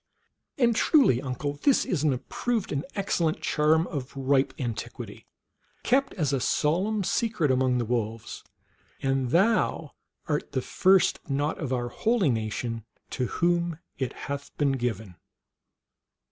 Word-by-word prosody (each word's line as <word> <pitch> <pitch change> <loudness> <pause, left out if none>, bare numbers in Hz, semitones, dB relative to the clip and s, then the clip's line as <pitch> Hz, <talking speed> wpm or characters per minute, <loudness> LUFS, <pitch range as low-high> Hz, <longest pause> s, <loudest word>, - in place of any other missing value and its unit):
And 240 -4 +3
truly, 245 - +4
uncle, 145 +2 -4
this 280 - +3
is 170 -6 -1
an 150 -1 +3
approved 220 - -2
and 140 - -1
excellent 170 -5 0
charm 155 +2 +2
of 140 -4 -6
ripe 135 0 +2
antiquity, 120 -5 -6 0.6
kept 275 +3 +2
as 150 -6 0
a 135 - +1
solemn 190 - +1
secret 185 - +1
among 130 -1 +2
the 120 - 0
wolves, 115 -1 -3 0.6
and 135 -2 +1
thou 200 - +2 0.3
art - - -2
the - - 0
first 190 -1 +3
not 145 +3 -1
of 145 -5 -3
our 120 -1 -1
holy 215 - +1
nation 115 0 -3 0.3
to 125 -2 -1
whom 170 -1 0 0.2
it 130 -2 -2
hath 140 0 -5
been 145 -2 +2
given." 110 -8 -3
145 Hz, 135 wpm, -27 LUFS, 125-180 Hz, 0.6 s, truly